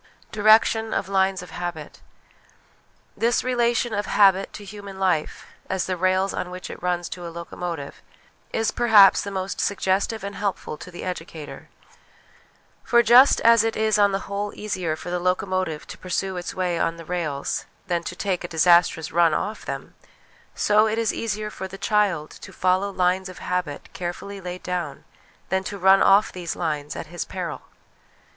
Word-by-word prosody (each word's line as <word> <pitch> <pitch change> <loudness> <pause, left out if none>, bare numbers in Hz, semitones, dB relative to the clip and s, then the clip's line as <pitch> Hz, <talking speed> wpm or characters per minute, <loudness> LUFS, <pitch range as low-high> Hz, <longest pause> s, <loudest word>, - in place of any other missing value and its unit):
Direction 220 +1 +4
of 195 - -1
Lines 190 -1 +1
of 180 - -12
Habit. 175 -3 -6 1.1
This 235 +1 +1
relation 240 -1 +1
of 205 0 -2
habit 195 -1 +4
to 205 - -9
human 200 -1 -9
life 180 -5 0 0.2
as 190 -1 -1
the 185 - -2
rails 185 +2 +1
on 180 - -3
which 180 0 -7
it - - -10
runs 175 -1 -1
to 175 -1 -7
a - - -5
locomotive 170 -3 -6 0.5
is 225 0 0
perhaps 215 -5 +6
the 200 - -5
most 190 -1 -3
suggestive 200 +2 0
and 200 0 -5
helpful 200 -6 -3
to 180 - -11
the 175 - -8
educator; 165 -4 -7 1.1
for 235 0 +4
just 250 +4 +7
as 230 -1 +6
it 225 0 -1
is 220 -1 +2
on 200 -1 +5
the 195 0 -1
whole 200 +1 -3
easier 185 -7 -2
for 175 - -7
the 180 - -1
locomotive 185 -3 -1
to - - -10
pursue 185 +1 -2
its 175 -1 -5
way 180 -2 -1
on 165 0 0
the 165 - -10
rails 155 -5 -3 0.2
than 175 -3 -1
to 175 - -5
take 185 -1 -2
a - - -4
disastrous 170 -1 +3
run 170 -1 +4
off 215 +2 -3
them, - - -6 0.6
so 210 +1 +4
it 220 +1 -1
is 230 -2 +1
easier 215 -1 -3
for 190 - -6
the 190 +1 -10
child 195 -8 +1
to - - -11
follow 185 +2 +1
lines 185 0 0
of 185 - -11
habit 180 -5 -3
carefully 190 +3 -6
laid 180 0 -7
dovn 175 -5 -4 0.5
than 190 +1 0
to 200 +1 -5
run 190 +1 +5
off 200 +3 +5
these 175 -2 -5
lines 150 -3 -3
at - - -5
his 175 +1 -5
peril. - - -5
185 Hz, 175 wpm, -24 LUFS, 175-205 Hz, 1.1 s, just